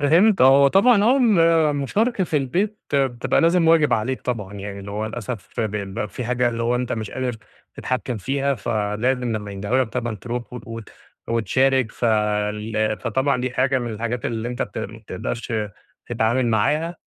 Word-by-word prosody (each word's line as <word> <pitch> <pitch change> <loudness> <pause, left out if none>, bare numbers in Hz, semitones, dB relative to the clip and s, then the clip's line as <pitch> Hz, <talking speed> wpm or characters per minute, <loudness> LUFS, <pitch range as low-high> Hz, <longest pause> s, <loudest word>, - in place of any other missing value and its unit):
فهمت، 175 +9 +4
هو 135 +1 +7
طبعًا 205 - +5
آه 250 +5 +5 0.5
ال 145 - -2
مشاركة 200 - 0
في 155 - -1
البيت 185 +11 -1 0.2
بتبقى 130 -4 +1
لازم 165 0 +3
واجب 160 -2 +4
عليك 125 +4 0
طبعًا، 105 -6 -4
يعني 100 0 -6
اللي 100 - -8
هو 105 +2 -3
للأسف 110 -2 -6
ب 110 -2 -1
بيبقى 100 0 -4
في 120 +5 -6
حاجة 125 0 +1
اللي 115 -1 -3
هو 120 +1 +1
أنت 125 0 -2
مش 110 -2 -4
قادر 125 -3 -3 0.4
تتحكّم 125 -1 -3
فيها، 135 +7 -1
فلازم 115 +3 -1
لمّا 105 -1 -6
يندهوا 105 +7 0
لك - - -11
طبعًا 120 0 -3
ترُوح 120 +4 -6
و 125 - -5
وت 115 -2 -8 0.4
وتشارك 120 +3 +1
ف - - -5
ال 105 0 0
فطبعًا 130 +3 0
دي 125 0 -2
حاجة 130 +1 +1
من 120 -2 -4
الحاجات 115 +2 -3
اللي 115 0 -3
أنت 125 +1 -2
بت - - -6
ما 110 0 -6
بتقدرش 110 +3 -5 0.5
تتعامل 120 +2 +1
معاها، 150 +10 +1
120 Hz, 180 wpm, -22 LUFS, 110-135 Hz, 0.5 s, هو